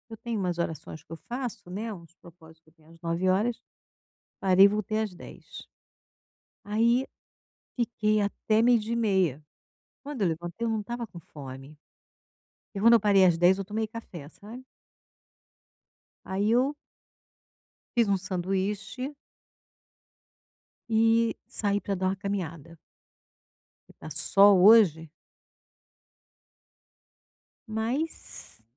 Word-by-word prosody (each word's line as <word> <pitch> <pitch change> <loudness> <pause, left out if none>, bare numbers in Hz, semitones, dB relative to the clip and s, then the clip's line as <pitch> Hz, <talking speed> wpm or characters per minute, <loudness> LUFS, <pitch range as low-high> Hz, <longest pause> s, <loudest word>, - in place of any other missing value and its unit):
Eu 225 - -8
tenho 235 0 -4
umas 180 -2 -2
orações 160 -2 -5
que - - -65
eu - - -5
faço, 235 -1 -7
né, 215 +5 -4
uns 170 -3 -13
propósito 160 -2 -18
que - - -23
eu - - -30
tenho 155 0 -24
às 165 0 -18
09:00, 185 +7 0 0.8
parei 190 0 +6
e - - +8
voltei 215 +1 -2
às 215 -4 -3
10:00. 175 - -12 1.0
Aí, 235 +5 +2 0.7
fiquei 215 -3 0
até 215 +2 0
12:30. 215 - +1 0.6
Quando 285 -5 -6
eu 195 - +3
levantei, 175 +6 -4
eu - - 0
não 220 -1 -1
estava 235 +3 -5
com 180 -5 -12
fome. 140 -2 -11 1.0
E 195 - -4
quando 230 +3 +6
eu 230 - +5
parei 200 -2 +4
às 175 -3 +4
10:00 180 +3 +4
eu 195 - -3
tomei 215 +3 -3
café, 200 -9 -10
sabe. 225 +9 -12 1.6
Aí 200 +3 0
eu 260 +5 +2 1.2
fiz 235 -2 +4
um 200 -1 +2
sanduíche 195 +7 -3 1.8
e 225 +1 +3
saí 205 -1 -1
pra 200 - -2
dar 185 0 -1
uma 190 - 0
caminhada 170 -5 -5 1.1
que - - -18
tá 155 - -11
sol 190 +5 +5
hoje. 185 -8 +6 2.6
Mas 230 - -2
200 Hz, 120 wpm, -27 LUFS, 175-225 Hz, 2.6 s, e